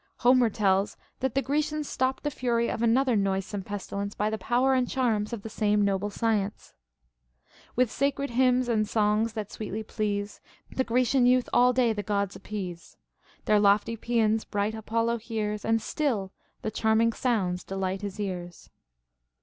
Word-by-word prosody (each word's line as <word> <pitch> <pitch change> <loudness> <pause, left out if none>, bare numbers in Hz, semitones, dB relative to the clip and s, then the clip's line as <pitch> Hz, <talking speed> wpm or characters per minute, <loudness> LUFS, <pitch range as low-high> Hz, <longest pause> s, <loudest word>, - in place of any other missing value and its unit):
Homer 245 -1 +4
tells 195 -2 +1 0.2
that 265 -2 -1
the 275 - +2
Grecians 300 +1 -1
stopped 260 +1 -1
the 295 - -1
fury 235 -3 0
of - - -4
another 245 +2 +3
noisome 195 0 -1
pestilence 200 +1 -5
by 210 +1 0
the 220 - -1
power 255 +2 +2
and 255 -2 +1
charms 225 -5 0
of 230 -4 -5
the - - -5
same 210 -1 +2
noble 200 +1 0
science: 210 -2 -2 0.5
— - - -30
With 250 -2 +2
sacred 280 -1 -1
liymns 250 0 +3
and 215 -3 +1
songs 215 +1 +1
tliat 210 -2 -4
sweetly 215 0 -5
please. 205 -1 -3 0.3
The 260 - 0
Grecian 250 +1 +2
youth 250 0 +3
all 250 +1 +5
day 245 -2 +2
the 205 - -3
Gods 200 -1 -1
appease. 185 -5 -7 0.5
Their 210 -1 +4
lofty 205 +3 +3
paeans 225 -1 +1
bright 205 +1 -1
Apollo 230 +1 -1
hears, 215 -2 -3
And 225 0 +2
still 225 -8 -1 0.3
the 220 - -2
charming 220 +1 +2
sounds 190 -9 0
delight 190 0 -3
his 200 -1 -6
ears. 180 -4 -5
220 Hz, 165 wpm, -27 LUFS, 205-245 Hz, 0.5 s, all